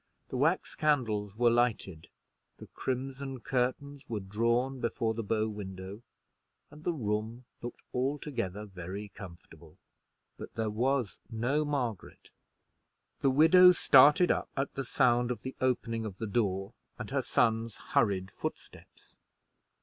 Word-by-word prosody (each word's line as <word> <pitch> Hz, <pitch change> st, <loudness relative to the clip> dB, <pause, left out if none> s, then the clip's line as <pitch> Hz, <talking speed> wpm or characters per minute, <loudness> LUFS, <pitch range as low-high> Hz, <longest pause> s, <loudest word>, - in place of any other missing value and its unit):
The 130 Hz, -, -3 dB
wax 160 Hz, +7 st, +1 dB
candles 110 Hz, -9 st, 0 dB
were 120 Hz, +1 st, +4 dB
lighted, 115 Hz, -9 st, 0 dB, 0.5 s
the -, -, -10 dB
crimson 135 Hz, +1 st, -4 dB
curtains 135 Hz, +3 st, -2 dB
were 110 Hz, -3 st, -2 dB
drawn 115 Hz, +7 st, 0 dB
before 115 Hz, -1 st, -1 dB
the 115 Hz, -, -3 dB
bow 110 Hz, +1 st, 0 dB
window, 100 Hz, -1 st, -7 dB, 0.7 s
and 150 Hz, +1 st, -14 dB
the 175 Hz, -, +1 dB
room 110 Hz, -3 st, -3 dB, 0.2 s
looked 120 Hz, -, -8 dB
altogether 125 Hz, -7 st, -2 dB
very 95 Hz, +1 st, -7 dB
comfortable: 85 Hz, -5 st, -13 dB, 0.6 s
but -, -, -9 dB
there 110 Hz, -2 st, -1 dB
was 125 Hz, 0 st, 0 dB
no 125 Hz, +6 st, 0 dB
Margaret. 130 Hz, -9 st, -4 dB, 0.9 s
The 135 Hz, -, +3 dB
widow 165 Hz, +6 st, +7 dB
started 150 Hz, +3 st, +6 dB
up -, -, -1 dB
at 135 Hz, 0 st, -1 dB
the 135 Hz, -, -4 dB
sound 120 Hz, 0 st, +2 dB
of 125 Hz, -, -4 dB
the 130 Hz, -, -6 dB
opening 115 Hz, -3 st, 0 dB
of 100 Hz, -4 st, -6 dB
the 110 Hz, -, -4 dB
door 100 Hz, -3 st, -1 dB, 0.2 s
and -, -, -7 dB
her -, -, +1 dB
son's 115 Hz, -1 st, +1 dB, 0.2 s
hurried 95 Hz, -3 st, +2 dB
footsteps. -, -, -9 dB
120 Hz, 135 wpm, -30 LUFS, 105-135 Hz, 0.9 s, widow